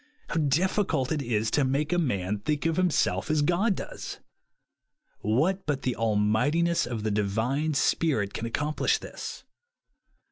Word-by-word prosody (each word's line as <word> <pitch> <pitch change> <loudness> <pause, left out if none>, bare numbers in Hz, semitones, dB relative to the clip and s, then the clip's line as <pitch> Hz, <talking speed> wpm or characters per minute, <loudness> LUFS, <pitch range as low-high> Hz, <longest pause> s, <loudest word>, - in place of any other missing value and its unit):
How - - -2
difficult 155 -1 +1
it 155 -2 0
is 115 -3 0
to 145 - +3
make 140 +5 0
a 175 - +2
man 105 - -1
think 150 +7 -2
of 165 -1 +2
himself 150 - +1
as 155 -1 +2
God 185 +7 +2
does! - - -7 1.0
What 155 - +1
but 140 -3 -1
the 125 - 0
almightiness 115 +11 +2
of 115 -3 -4
the 110 - 0
Divine 115 +9 0
Spirit 135 -11 +1
can 115 - -3
ac 115 - -9
complish 150 +1 +1
this - - -8
140 Hz, 150 wpm, -27 LUFS, 110-160 Hz, 1.0 s, to